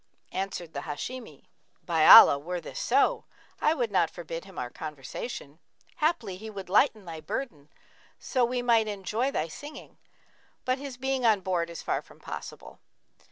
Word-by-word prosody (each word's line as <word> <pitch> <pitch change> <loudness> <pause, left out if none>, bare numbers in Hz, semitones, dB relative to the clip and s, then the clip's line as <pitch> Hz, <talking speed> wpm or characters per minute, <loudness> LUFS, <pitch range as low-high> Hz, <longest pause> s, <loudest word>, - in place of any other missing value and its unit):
Answered 185 -4 -4
the 140 - -3
Hashimi, 155 - -7 0.4
'By 165 -3 +3
Allah, 140 - +11
were 175 +4 -4
this - - -8
so, - - +2 0.4
I 310 - +3
would 240 -7 -1
not 175 -4 +3
forbid 165 0 -7
him 195 - -14
our 125 -1 -4
conversation! 150 - -7 0.4
Haply 240 - 0
he 220 +3 -8
would 195 -4 -8
lighten 215 0 +3
thy 165 -2 -7
burthen, 155 - -5 0.5
so 255 -3 0
we 245 +1 0
might 230 -2 +3
enjoy 210 +5 -1
thy 165 - -1
singing: 290 - -11 0.7
but 255 +1 0
his 275 -3 -7
being 265 0 -1
on 220 -4 +4
board 175 -2 -1
is 170 - -8
far - - -1
from - - -19
possible.' - - -9
195 Hz, 160 wpm, -28 LUFS, 165-245 Hz, 0.7 s, Allah